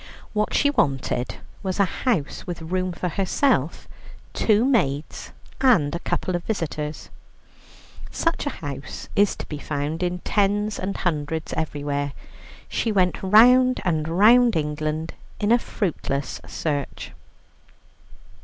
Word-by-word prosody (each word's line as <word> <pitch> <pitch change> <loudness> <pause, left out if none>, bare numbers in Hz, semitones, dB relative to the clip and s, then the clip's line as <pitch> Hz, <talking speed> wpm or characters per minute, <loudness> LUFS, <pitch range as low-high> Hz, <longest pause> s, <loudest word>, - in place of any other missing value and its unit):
What 210 0 0
she 285 - +4
wanted 135 - 0 0.3
was 190 0 -3
a 200 - +5
house 190 - -2
with 175 -1 -4
room 185 +2 -1
for 180 +1 -3
herself, 190 - 0 0.5
two 220 +1 +3
maids, 150 - 0 0.3
and 220 - +4
a 170 - -2
couple 185 +1 -2
of 175 - -3
visitors. 155 -7 -4 1.0
Such 330 -3 -1
a 255 - -6
house 140 -1 -6
is 205 0 +3
to - - -7
be 150 - -6
found 150 +3 -3
in 180 0 0
tens 205 +1 0
and 195 +1 -3
hundreds 160 -2 -2
everywhere. 145 -2 -2 0.5
She 225 - -1
went 185 -3 +1
round 250 +6 +6
and 160 -3 0
round 225 +7 +5
England 155 +1 -2 0.3
in 210 +1 +1
a 240 - +6
fruitless 145 -11 -3
search. 145 -3 -3
180 Hz, 125 wpm, -24 LUFS, 150-210 Hz, 1.0 s, round